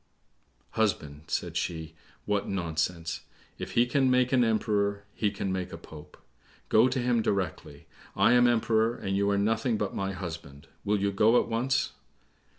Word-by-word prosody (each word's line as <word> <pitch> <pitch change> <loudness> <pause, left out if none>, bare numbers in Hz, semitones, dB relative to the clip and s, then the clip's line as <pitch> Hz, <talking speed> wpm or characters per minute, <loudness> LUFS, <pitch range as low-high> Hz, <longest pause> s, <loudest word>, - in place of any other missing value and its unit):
"Husband," 80 -9 -1
said - - -2
she, 80 -2 -3 0.3
"what 105 -1 -1
nonsense! 85 -2 -2 0.4
If - - -6
he 120 - +4
can 135 +1 +2
make 125 0 +2
an 125 -2 +5
emperor 105 -3 0
he 105 - 0
can 100 -1 -3
make 95 -1 -3
a - - -6
pope. 75 -1 -13 0.5
Go 110 +3 +5
to 130 +1 -1
him 120 -2 +2
directly. 100 -5 -3 0.3
I - - +4
am 120 0 +6
Emperor, 115 -1 +2
and 95 -4 -3
you 100 +1 +2
are 100 - +2
nothing 110 +3 +1
but 105 -2 -2
my 95 0 -2
husband; 80 -7 -7 0.2
will 105 0 +1
you 100 +1 +1
go 110 +4 +4
at - - -2
once?" 125 +4 0
105 Hz, 165 wpm, -28 LUFS, 95-115 Hz, 0.5 s, am